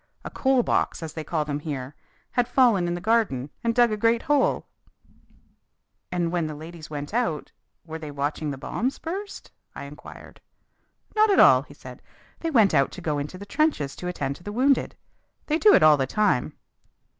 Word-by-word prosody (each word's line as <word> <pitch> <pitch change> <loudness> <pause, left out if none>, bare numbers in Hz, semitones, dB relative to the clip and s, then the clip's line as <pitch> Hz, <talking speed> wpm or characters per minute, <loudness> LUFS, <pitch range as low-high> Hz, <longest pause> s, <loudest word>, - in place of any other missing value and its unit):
A - - -6
'coal 265 -2 +2
box,' 175 - 0
as 160 - -6
they 160 - -5
call 155 -1 -2
them 145 -1 -3
here, 145 -3 -5 0.4
had 245 -1 +1
fallen 240 -8 +3
in 175 - -1
the - - -4
garden 180 - 0
and 230 -1 0
dug 240 -2 +4
a 215 - -1
great 230 +2 +2
hole!" 290 -2 +1 1.5
"And 175 -2 -1
when 170 -3 -1
the 155 - -5
young 150 - -10
ladies 160 0 -10
went 145 +3 -6
out, 225 - -1 0.3
were 160 -1 -7
they 155 -2 -7
watching 145 +2 -3
the 140 - -4
bombs 245 - -3
burst?" 390 +5 -7 0.2
I - - -7
inquired. 145 +1 -12 0.7
"Not 430 0 +4
at 395 - +4
all," - - +7
he - - -15
said. - - -12 0.4
"They 330 - -2
went 225 -10 +4
out 135 - +3
to - - -8
go 150 -2 -1
into 150 +6 -6
the 200 - -9
trenches 205 - 0
to 180 - -6
attend 140 -6 -3
to - - -19
the 205 - -6
wounded. 265 +5 +1 0.5
They 310 +1 0
do 425 - +6
it - - +4
all 155 -1 +7
the 135 -1 -1
time." 200 - 0
175 Hz, 200 wpm, -25 LUFS, 150-240 Hz, 1.5 s, all